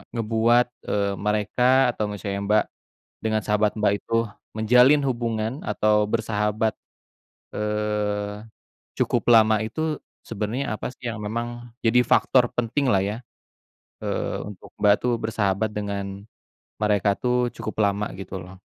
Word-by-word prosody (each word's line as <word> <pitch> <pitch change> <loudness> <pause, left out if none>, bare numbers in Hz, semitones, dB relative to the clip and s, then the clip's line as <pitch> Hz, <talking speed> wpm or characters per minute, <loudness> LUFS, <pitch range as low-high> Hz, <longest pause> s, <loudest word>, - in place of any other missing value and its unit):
ngebuat, 115 +2 +3 0.2
eee, 100 -1 +1 0.2
mereka 105 +3 0 0.3
atau 110 - -3
misalnya 100 -1 -4
Mbak 105 +1 +4 0.6
dengan 110 -1 +1
sahabat 105 0 +2
Mbak 100 - +3
itu, - - -7 0.4
menjalin 125 +6 +5
hubungan 115 -2 -1 0.2
atau 105 0 +3
bersahabat, 110 -1 0 0.8
eee, 105 -1 -2 0.6
cukup - - +1
lama 110 -1 +5
itu 110 +8 -6 0.5
sebenernya 110 +3 -2
apa 110 - -5
sih 120 -1 -8
yang 105 -2 -4
memang 120 +2 -5
jadi 125 +1 +3
faktor 125 +1 +3
penting 125 +2 0
lah 95 - +4
ya, 105 - -3 0.9
eee, - - -2
untuk 100 - -12
Mbak 105 -1 +5
tuh 125 - +1
bersahabat 110 -1 0
dengan 100 -1 -3 0.8
mereka 105 -1 +2
tuh 125 0 +1 0.2
cukup 110 - -5
lama 100 +1 -1
gitu 95 0 -8
loh? 90 +1 -12
110 Hz, 130 wpm, -24 LUFS, 105-115 Hz, 0.9 s, menjalin